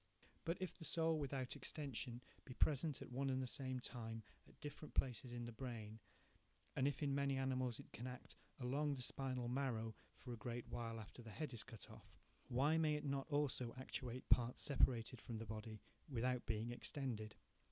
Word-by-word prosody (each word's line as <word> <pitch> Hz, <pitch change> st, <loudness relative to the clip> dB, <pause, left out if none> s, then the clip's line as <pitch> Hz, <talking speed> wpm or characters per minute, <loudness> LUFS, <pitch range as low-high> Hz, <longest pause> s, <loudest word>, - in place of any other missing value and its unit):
3 -, -, -26 dB, 0.2 s
But 165 Hz, +2 st, +2 dB
if 185 Hz, -1 st, -1 dB
the -, -, -6 dB
soul, 160 Hz, 0 st, +4 dB
without 135 Hz, -2 st, -1 dB
extension, 130 Hz, -3 st, -2 dB, 0.2 s
be 125 Hz, -, -8 dB
present 150 Hz, 0 st, +3 dB
at -, -, -10 dB
one 135 Hz, +2 st, +1 dB
and 130 Hz, 0 st, +2 dB
the 130 Hz, -, +1 dB
same 130 Hz, 0 st, 0 dB
time 115 Hz, -2 st, -4 dB, 0.2 s
at -, -, -18 dB
different 150 Hz, +1 st, -6 dB
places 125 Hz, -1 st, +2 dB
in 120 Hz, 0 st, -2 dB
the 120 Hz, -, -4 dB
brain, 110 Hz, -3 st, -4 dB, 0.8 s
and 135 Hz, -, +4 dB
if 145 Hz, +2 st, 0 dB
in 140 Hz, -1 st, +3 dB
many 140 Hz, -1 st, +3 dB
animals 130 Hz, -2 st, +2 dB
it -, -, -10 dB
can 120 Hz, -, -4 dB
act 125 Hz, 0 st, -6 dB, 0.2 s
along 140 Hz, +3 st, +2 dB
the 130 Hz, -, -2 dB
spinal 130 Hz, -2 st, 0 dB
marrow 120 Hz, -4 st, +1 dB, 0.2 s
for 125 Hz, -, -5 dB
a -, -, -4 dB
great 120 Hz, +1 st, -3 dB
while 115 Hz, -1 st, -2 dB
after 110 Hz, +3 st, -8 dB
the 115 Hz, -, -8 dB
head 150 Hz, +4 st, -3 dB
is 115 Hz, -, -2 dB
cut 115 Hz, -5 st, -8 dB
off, -, -, -13 dB, 0.3 s
why 140 Hz, +6 st, +5 dB
may 155 Hz, -2 st, +4 dB
not 140 Hz, -2 st, 0 dB
it -, -, -18 dB
also 135 Hz, -5 st, +2 dB
actuate 130 Hz, -1 st, -3 dB
parts 120 Hz, 0 st, +5 dB
separated 125 Hz, -4 st, +4 dB
from 115 Hz, 0 st, -3 dB
the 115 Hz, -, -3 dB
body 110 Hz, 0 st, -5 dB, 0.3 s
without 125 Hz, -1 st, +1 dB
being 110 Hz, +1 st, +1 dB
extended? 120 Hz, -4 st, -2 dB
125 Hz, 195 wpm, -44 LUFS, 120-140 Hz, 0.8 s, why